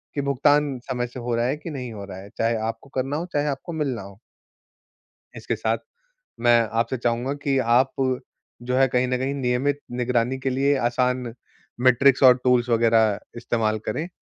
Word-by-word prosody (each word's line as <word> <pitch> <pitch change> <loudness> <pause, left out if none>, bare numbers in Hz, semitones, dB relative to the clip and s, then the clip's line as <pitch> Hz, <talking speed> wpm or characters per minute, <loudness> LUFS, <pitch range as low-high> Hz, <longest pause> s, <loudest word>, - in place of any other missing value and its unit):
कि 140 - 0
भुगतान 140 0 +2
समय 125 -1 -1
से 125 +1 -9
हो 120 0 -2
रहा 120 +1 +1
है 135 +4 0
कि 160 +2 -8
नहीं 125 -4 -5
हो 100 -2 -7
रहा 95 -1 -9
है। 100 +1 -11
चाहे 115 +1 +1
आपको 115 +4 -8
करना 135 +3 -1
हो, 170 - -3
चाहे 145 0 +1
आपको 145 +5 -4
मिलना 140 -7 -2
हो। 100 +1 -13 1.2
इसके - - -3
साथ, - - 0 0.6
मैं 120 0 +5 0.2
आपसे 120 +3 0
चाहूँगा 120 +3 -1
कि 135 -1 +1 0.2
आप 135 +1 +2 0.7
जो 125 +1 -2
है 135 0 +5
कहीं 125 0 +1
न 125 0 0
कहीं 135 +2 -2
नियमित 135 +2 0
निगरानी 125 +1 0
के 130 0 -1
लिए 140 +2 +2
आसान 125 0 0 0.5
मैट्रिक्स 130 +2 +4
और 125 -1 +8
टूल्स 125 -1 +3
वग़ैरह 115 -2 +3 0.2
इस्तेमाल 110 -2 -1
करें, 155 +10 -2
125 Hz, 180 wpm, -24 LUFS, 120-135 Hz, 1.2 s, और